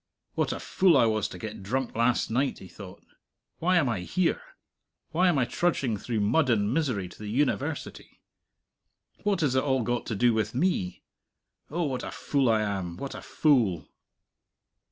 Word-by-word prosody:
What - - 0
a - - -4
fool 185 -5 +3
I 120 - +5
was 110 -2 +1
to - - -9
get 110 -3 -7
drunk 125 +6 -2
last 115 0 +1
night, 135 +4 0
he 95 - -11
thought. 95 +1 -12 0.5
Why 180 +2 +3
am 160 -6 +3
I 115 -5 -1
here? 185 - 0 0.7
Why 180 +4 +3
am 175 -5 +3
I 130 - +3
trudging 130 -3 0
through 110 +1 -2
mud 135 +8 +2
and 105 -1 +2
misery 125 - 0
to - - -15
the 105 - -7
University? 145 +4 -2 1.0
What 205 -4 0
has 145 -5 +2
it 130 - +3
all 130 -3 +1
got 120 +2 -2
to 110 - -2
do 120 +3 +3
with 110 0 -1
me? 125 - 0 0.7
Oh, 170 +4 -1
what 135 -5 -2
a - - -4
fool 140 -4 0
I 110 -1 +3
am, 95 -4 -3
what 135 +7 -5
a - - -7
fool! 115 - +1
125 Hz, 180 wpm, -27 LUFS, 105-145 Hz, 1.0 s, I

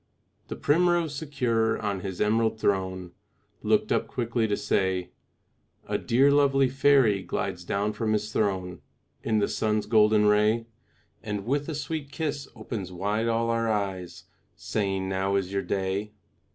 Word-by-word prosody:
The - - -5
primrose, 170 0 +2
secure 125 -7 0
on 100 -3 -2
his 95 -1 -6
emerald 110 +1 +1
throne, 95 -3 -1 0.5
Looked - - +1
up - - +1
quickly 120 -2 -1
to 105 - 0
say, 95 -2 0 0.8
"A - - -1
dear 135 +4 +3
lovely 135 -2 +4
fairy 130 -6 +4
glides 90 -1 -3
down 100 +4 -1
from 110 0 -1
his 105 0 -2
throne 95 -4 -1 0.4
In 110 - 0
the 105 - +2
sun's 105 -1 0
golden 105 -1 +4
ray, 105 +2 +3 0.6
And 105 -2 -4
with 145 +4 -1
a 160 - -3
sweet 150 -1 -4
kiss 145 -3 -3
opens 100 -6 -6
wide 105 +5 -1
all 115 0 +1
our 115 0 0
eyes, 95 -4 -3 0.3
Saying, 95 -2 -2
'Now 95 +1 0
is 95 -1 -1
your 100 - 0
day.' 100 +2 -2
110 Hz, 150 wpm, -27 LUFS, 100-125 Hz, 0.8 s, lovely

